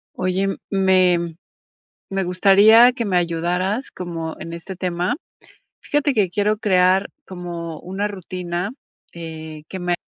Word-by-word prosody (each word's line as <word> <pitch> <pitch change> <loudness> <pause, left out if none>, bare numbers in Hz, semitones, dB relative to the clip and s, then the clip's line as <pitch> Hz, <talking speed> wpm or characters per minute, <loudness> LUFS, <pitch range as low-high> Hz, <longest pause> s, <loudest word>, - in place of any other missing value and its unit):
Oye, 185 +2 0 0.2
me 185 -4 +2 0.7
-me 195 0 -1
gustaría, 205 +6 +6
que 245 -2 -3
me 195 -4 0
ayudaras, 180 +7 -1
como 165 -3 -5
en 165 - -7
este 170 +3 -7
tema. 180 +4 -1 0.6
Fíjate 290 -1 0
que 210 -6 +2
quiero 210 +3 0
crear, 190 -1 +3 0.2
como 170 -3 -6
una 190 +3 -3
rutina, 180 -1 -4 0.4
eh, 160 -2 -8
que 190 - -6
me 180 -1 0
185 Hz, 125 wpm, -21 LUFS, 170-200 Hz, 0.7 s, gustaría